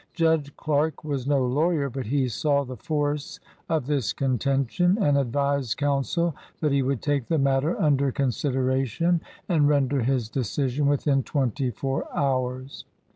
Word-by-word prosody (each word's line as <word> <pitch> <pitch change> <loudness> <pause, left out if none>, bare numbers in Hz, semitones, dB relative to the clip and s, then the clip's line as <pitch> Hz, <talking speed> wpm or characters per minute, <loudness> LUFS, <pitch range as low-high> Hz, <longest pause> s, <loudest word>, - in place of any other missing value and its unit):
Judge 160 -4 +1
Clark 150 0 0
was 140 -4 -3
no 140 -3 +2
lawyer, 145 +3 +1
but 130 -3 -5
he 135 +1 +1
saw 140 +4 +1
the 130 -1 -7
force 145 -1 -2 0.3
of 155 -5 0
this 140 -6 0
contention, 140 - +1
and 145 -8 +3
advised 140 -2 0
counsel 145 +3 0 0.2
that 150 -2 +1
he 140 0 +3
would 135 -2 -1
take 145 -4 0
the 165 - +1
matter 135 +3 +1
under 140 -3 +2
con 135 0 0
sideration 135 +5 0 0.3
and 150 -5 +3
render 140 -2 +2
his 125 -1 0
decision 135 +4 -1
within 140 -1 +2
twenty 130 -1 -1
four 135 +4 -3
hours. 130 -1 -1
140 Hz, 150 wpm, -25 LUFS, 130-150 Hz, 0.3 s, and